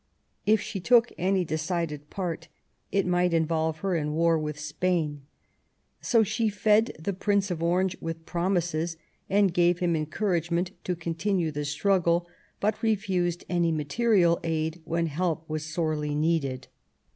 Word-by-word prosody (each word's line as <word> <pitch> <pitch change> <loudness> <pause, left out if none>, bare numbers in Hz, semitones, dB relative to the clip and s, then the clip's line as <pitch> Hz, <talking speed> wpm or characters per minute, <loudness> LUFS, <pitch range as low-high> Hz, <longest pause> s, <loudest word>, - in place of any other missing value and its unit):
If 215 0 +5
she 205 -1 -5
took 235 +5 +4
any 185 0 +1
decided 155 -2 -3
part 180 -4 -4 0.4
it 195 -1 +2
might 180 -1 +2
involve 160 -1 0
her 195 -2 0
in 150 -2 -1
war 165 0 +3
with 150 -1 -4
Spain. 150 -1 -1 0.8
So 230 -2 +4
she 220 +2 0
fed 210 +2 +3
the 180 +6 -3
Prince 200 +1 0
of 165 -2 -3
Orange 180 +2 +1
with 165 0 -5
promises 170 -2 -1 0.3
and 195 -2 +3
gave 175 0 +3
him 175 -2 +1
encouragement 170 +2 -1
to 180 - -1
continue 170 +1 -1
the 150 0 -3
struggle, 170 +2 +1 0.3
but 210 +1 0
refused 190 -6 0
any 170 -2 +1
material 170 +3 +2
help 160 0 -1
when 165 0 0
help 165 0 -2
was 155 -1 -3
sorely 155 -2 -1
needed. 150 -4 0
170 Hz, 145 wpm, -27 LUFS, 160-190 Hz, 0.8 s, If